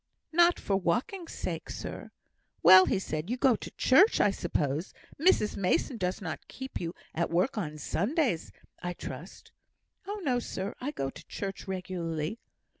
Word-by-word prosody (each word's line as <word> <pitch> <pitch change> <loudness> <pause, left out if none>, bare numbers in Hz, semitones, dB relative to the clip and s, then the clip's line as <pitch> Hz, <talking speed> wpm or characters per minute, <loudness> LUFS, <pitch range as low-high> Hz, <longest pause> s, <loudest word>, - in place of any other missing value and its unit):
"Not 345 +1 +5
for 195 - +1
walking's 255 - -1
sake, - - -4
sir." - - -6 0.5
"Well!" 185 0 +9
said 155 -5 -1
he, - - +1
"you - - -2
go 255 -2 +4
to - - -7
church, 380 - +5
I 205 - +5
suppose? 160 -3 -2 0.2
Mrs 320 - +3
Mason 200 +6 +1
does 185 0 -2
not 160 -3 -5
keep 265 0 -6
you 170 0 -4 0.2
at 170 - 0
work 180 +10 +1
on 155 -8 -3
Sundays, 200 - 0 0.3
I 175 0 -3
trust?" - - -9 0.6
"Oh, 415 +1 -3
no, 255 -5 +2
sir. 200 -3 -4
I 265 - -2
go 135 - -3
to - - -13
church 195 0 -5
regularly." 180 0 -3
195 Hz, 160 wpm, -30 LUFS, 170-260 Hz, 0.6 s, Well